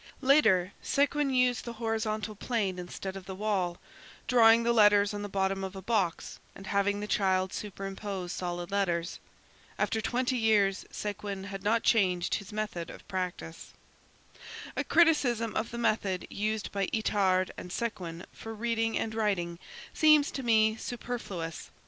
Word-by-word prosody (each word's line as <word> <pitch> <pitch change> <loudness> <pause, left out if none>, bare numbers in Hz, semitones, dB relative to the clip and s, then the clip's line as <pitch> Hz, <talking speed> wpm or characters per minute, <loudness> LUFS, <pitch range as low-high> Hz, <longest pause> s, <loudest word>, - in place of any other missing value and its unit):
Later, 215 -10 +4
Séguin 285 0 +1
used 250 -1 +2
the 235 - -6
horizontal 220 -1 -2
plane 205 -4 -2
instead 190 +2 -6
of 190 -1 -9
the 190 - -5
wall, 190 -4 -1 0.5
drawing 230 -1 +6
the 235 0 +2
letters 205 -2 +5
on 205 - -4
the 205 - -5
bottom 195 0 0
of 190 +1 -5
a 190 - -6
box 195 -6 -1 0.2
and 195 - -10
having 200 +1 +1
the 210 - -3
child 190 -2 +1
superimpose 195 -2 -5
solid 175 0 -4
letters. 175 -3 -1 0.6
After 220 - 0
twenty 250 +3 0
years, 205 -4 +2
Séguin 200 -1 -5
had 195 -1 -6
not 225 +3 +1
changed 185 -6 +2
his 200 +1 -3
method 210 -6 -4
of - - -12
procedure. 180 -3 -4 1.2
A - - 0
criticism 250 -10 +3
of 220 - -1
the 235 - -6
method 215 -5 0
used 215 +1 -2
by 200 -1 -1
Itard 190 -4 +1
and 180 - -8
Séguin 180 -5 -4
for 225 0 -8
reading 225 0 0
and 220 - -2
writing 190 -6 -1 0.3
seems 305 -2 +5
to 270 - -4
me 220 -3 +3
superfluous. 220 -9 -5
205 Hz, 150 wpm, -29 LUFS, 190-225 Hz, 1.2 s, drawing